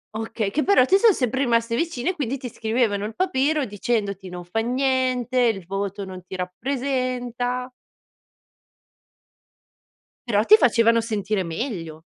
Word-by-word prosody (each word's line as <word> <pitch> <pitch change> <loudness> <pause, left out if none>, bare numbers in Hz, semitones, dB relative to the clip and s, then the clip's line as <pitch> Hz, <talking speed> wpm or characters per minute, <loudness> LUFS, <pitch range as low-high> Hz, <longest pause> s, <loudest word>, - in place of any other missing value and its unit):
Okay, 220 -2 -3
che 300 - 0
però 390 -11 +5
ti 390 +7 +4
so 455 -1 +6
sempre 260 - -1
rimaste 230 -3 +1
vicine, 335 +2 -1
quindi, 275 -4 -3
ti 255 -1 -7
scrivevano 220 -3 -1
il 220 - -6
papero, 305 -5 +1
dicendoti: 205 -3 -2
"Non 180 -1 -8
fa 200 +6 -2
niente, 255 0 0
il 220 -7 +1
voto 195 +1 -4
non 185 -1 -9
ti 190 - -8
rappresenta." 250 +4 -2 2.6
Però 210 -2 +3
ti 430 - +9
facevano 230 - +4
sentire 210 -3 -2
meglio. 165 - -5
235 Hz, 135 wpm, -23 LUFS, 200-260 Hz, 2.6 s, ti